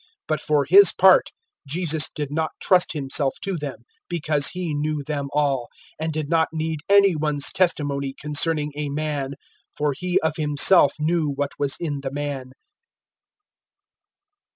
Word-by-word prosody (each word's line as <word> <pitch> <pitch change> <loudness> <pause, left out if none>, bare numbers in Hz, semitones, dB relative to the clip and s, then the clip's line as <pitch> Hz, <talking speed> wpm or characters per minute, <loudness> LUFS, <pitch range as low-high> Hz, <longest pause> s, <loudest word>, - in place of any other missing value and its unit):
002:024 - - -31 0.2
But 155 - -1
for 150 -2 +1
His 195 +5 +7
part, 190 0 +5 0.4
Jesus 160 0 +1
did 145 -2 -6
not 160 +1 -2
trust 180 -1 +2
Himself 140 -1 -1
to 195 -1 -2
them, 145 -7 -6 0.3
because 150 -4 +1
He 180 -4 -3
knew 150 0 -2
them 140 -1 -4
all, 140 -4 0 0.3
002:025 - - -1
and 160 - -2
did 155 -1 -3
not 160 0 +2
need 160 -1 -3
any 200 -3 +5
one's 150 -2 0
testimony 140 -6 -1
concerning 150 0 0
a 150 -1 -3
man, 145 -2 -3 0.4
for 145 -1 0
He 180 +4 0
of 160 -1 -1
Himself 150 +1 +4
knew 160 0 0
what 140 0 -3
was 140 -1 0
in 145 -5 -3
the 135 - -4
man. 140 -2 -5
150 Hz, 155 wpm, -22 LUFS, 145-160 Hz, 0.4 s, His